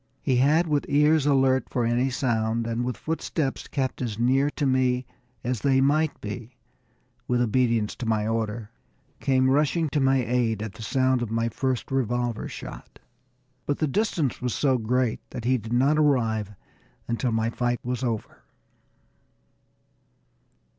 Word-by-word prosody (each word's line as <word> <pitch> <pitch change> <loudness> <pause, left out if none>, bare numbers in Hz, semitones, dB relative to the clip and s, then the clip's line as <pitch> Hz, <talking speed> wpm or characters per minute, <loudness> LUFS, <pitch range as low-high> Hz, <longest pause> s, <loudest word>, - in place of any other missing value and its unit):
He 130 -3 +2
had, 150 +7 +4
with 150 -3 0
ears 150 +1 +4
alert 135 -2 +3
for 120 -2 0
any 120 +3 +1
sound, 115 -3 0
and 115 +1 -1
with 125 0 -3
footsteps 155 -3 -3
kept 135 -2 -2
as 115 -5 -3
near 130 +4 +3
to 145 - -2
me 130 -1 +2 0.4
as 125 -2 -2
they 135 -1 +3
might 150 +3 +2
be 110 +3 -7 0.7
with 125 0 +1
obedience 115 -2 +1
to 120 - -4
my 110 -1 +1
order, 110 -1 -2 0.5
come 130 -2 +2
rushing 150 +3 +2
to 145 - 0
my 135 -2 +3
aid 115 -3 0
at 110 -3 -6
the - - -11
sound 130 +2 +1
at 120 - -2
my 115 +1 0
first 130 +2 -2
revolver 120 -3 -1
shot. - - -9 0.7
But 145 - 0
the 155 - +1
distance 160 - -1
was 125 -1 -1
so 130 -3 +2
great 120 +1 0
that 115 - -7
he 130 0 +2
did 110 +1 -9
not 135 +5 +3
arrive 110 -8 +1 0.5
until 120 +1 -1
my 110 +1 0
fight 120 0 -1
was 125 +1 -3
over. 115 -4 -3
125 Hz, 155 wpm, -25 LUFS, 115-135 Hz, 0.7 s, had